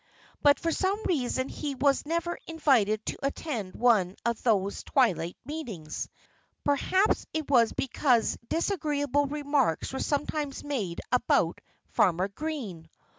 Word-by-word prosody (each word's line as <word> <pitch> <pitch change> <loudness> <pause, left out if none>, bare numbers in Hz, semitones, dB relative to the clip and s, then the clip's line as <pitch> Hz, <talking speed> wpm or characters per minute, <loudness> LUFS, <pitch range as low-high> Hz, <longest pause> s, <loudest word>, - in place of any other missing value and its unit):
But 285 -1 +5
for 330 - 0
some 385 +4 0
reason 260 -5 0
he 285 -1 -4
was 275 +2 +2
never 335 +1 -1
invited 240 -10 +2
to - - -4
attend 260 - -3
one 210 -6 +3
of 235 -1 0
those 200 -4 +1
twilight 185 - +1
meetings. 230 - -5 0.5
Perhaps 375 +8 +2
it 310 -3 -3
was 235 -4 +5
because 255 -3 +1
disagreeable 295 -5 0
remarks 285 - 0
were 265 - -3
sometimes 290 -1 -2
made 220 -13 -3
about 250 - +2 0.3
Farmer 185 0 +2
Green! 205 - -5
275 Hz, 125 wpm, -28 LUFS, 215-300 Hz, 0.5 s, But